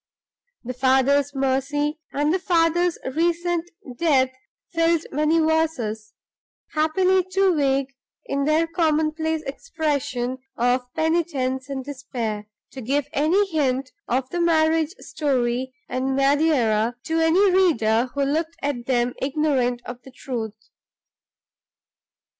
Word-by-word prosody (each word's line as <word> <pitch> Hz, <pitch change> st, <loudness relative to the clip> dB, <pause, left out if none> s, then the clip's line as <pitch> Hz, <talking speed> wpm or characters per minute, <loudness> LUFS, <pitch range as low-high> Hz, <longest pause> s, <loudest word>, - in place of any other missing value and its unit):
The 255 Hz, +1 st, -5 dB
father's 270 Hz, +2 st, +2 dB
mercy 280 Hz, +3 st, 0 dB
and 295 Hz, +3 st, +1 dB
the 375 Hz, -, +1 dB
father's 345 Hz, -1 st, +2 dB, 0.2 s
recent 345 Hz, +1 st, 0 dB, 0.3 s
death 270 Hz, -6 st, +3 dB, 0.4 s
filled 330 Hz, -1 st, +2 dB
many 305 Hz, +3 st, +2 dB
verses, 310 Hz, -10 st, 0 dB, 0.6 s
happily 365 Hz, +4 st, +2 dB
too 385 Hz, -1 st, +3 dB
vague 275 Hz, -2 st, +1 dB, 0.3 s
in 275 Hz, 0 st, -1 dB
their 310 Hz, +2 st, +3 dB
commonplace 315 Hz, -1 st, 0 dB
expression 275 Hz, -, -2 dB, 0.2 s
of 245 Hz, +1 st, +1 dB
penitence 295 Hz, -5 st, 0 dB
and 265 Hz, -2 st, -4 dB
despair 240 Hz, -7 st, -5 dB, 0.2 s
to 265 Hz, -, -8 dB
give 280 Hz, +4 st, -1 dB
any 330 Hz, +8 st, +3 dB
hint 270 Hz, -4 st, 0 dB, 0.2 s
of 255 Hz, +1 st, 0 dB
the 350 Hz, -, -1 dB
marriage 320 Hz, 0 st, +2 dB
story 260 Hz, -4 st, -1 dB, 0.2 s
in 260 Hz, +1 st, -1 dB
Madeira 270 Hz, -6 st, +2 dB
to 325 Hz, 0 st, -1 dB
any 355 Hz, +5 st, +4 dB
reader 255 Hz, -11 st, +3 dB
who 280 Hz, -, +1 dB
looked 320 Hz, +4 st, -1 dB
at 260 Hz, -4 st, -2 dB
them 245 Hz, -1 st, +1 dB
ignorant 265 Hz, -4 st, 0 dB
of 245 Hz, 0 st, -8 dB
the 265 Hz, -, -13 dB
truth. 225 Hz, -5 st, -6 dB
285 Hz, 115 wpm, -23 LUFS, 255-325 Hz, 0.6 s, any